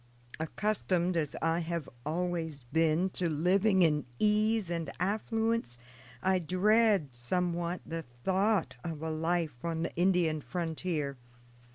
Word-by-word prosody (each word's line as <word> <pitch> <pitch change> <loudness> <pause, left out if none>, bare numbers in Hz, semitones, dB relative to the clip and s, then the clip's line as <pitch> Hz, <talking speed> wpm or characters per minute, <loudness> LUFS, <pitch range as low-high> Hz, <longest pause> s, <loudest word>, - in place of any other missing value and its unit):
"Accustomed 185 0 0
as 155 -4 -1
I 165 +1 +2
have 170 -2 -3 0.2
always 165 -3 -2
been 165 +3 +3
to 180 -2 0
living 185 +5 +3
in 150 -5 +2
ease 215 - +3
and 165 -4 -2
affluence, 220 - 0 0.5
I 190 0 +3
dread, 190 - +3
somewhat, 175 +7 -1
the 165 0 -4
thought 190 - 0
of 160 -3 -5
a 160 - -2
life 160 -4 -1
on 165 -1 -1
the - - -4
Indian 175 -3 +2
frontier. 160 -4 -3
170 Hz, 125 wpm, -31 LUFS, 160-190 Hz, 0.5 s, been